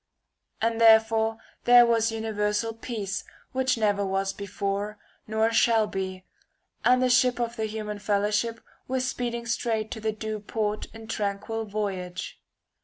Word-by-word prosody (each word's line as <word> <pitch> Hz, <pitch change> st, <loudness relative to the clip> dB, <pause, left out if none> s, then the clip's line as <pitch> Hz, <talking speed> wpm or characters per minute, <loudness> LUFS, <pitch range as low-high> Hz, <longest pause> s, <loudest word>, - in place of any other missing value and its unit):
And 230 Hz, 0 st, +1 dB
therefore 225 Hz, 0 st, +5 dB, 0.3 s
there 245 Hz, 0 st, +8 dB
was 230 Hz, -1 st, +2 dB
uni 225 Hz, 0 st, -3 dB
versal 210 Hz, +2 st, 0 dB
peace 205 Hz, -5 st, -3 dB, 0.3 s
which 260 Hz, -1 st, +1 dB
never 205 Hz, -2 st, +2 dB
was 195 Hz, 0 st, -1 dB
before 200 Hz, +1 st, -3 dB, 0.3 s
nor 220 Hz, +1 st, +1 dB
shall 225 Hz, -1 st, +4 dB
be, 190 Hz, -2 st, -5 dB, 0.6 s
and 250 Hz, +1 st, +4 dB
the -, -, +4 dB
ship 250 Hz, -1 st, +4 dB
of 235 Hz, 0 st, -1 dB
the 220 Hz, -2 st, -1 dB
human 210 Hz, -1 st, -4 dB
fellowship 210 Hz, +3 st, 0 dB, 0.3 s
was 255 Hz, 0 st, -1 dB
speed 245 Hz, -2 st, -2 dB
ing 235 Hz, 0 st, -5 dB
straight 225 Hz, -2 st, -1 dB
to -, -, -4 dB
the 220 Hz, 0 st, -1 dB
due 215 Hz, 0 st, -4 dB
port 210 Hz, 0 st, -2 dB
in 225 Hz, 0 st, -11 dB
tranquil 220 Hz, +1 st, -3 dB
voyage. 195 Hz, -4 st, -4 dB
220 Hz, 150 wpm, -27 LUFS, 205-230 Hz, 0.6 s, there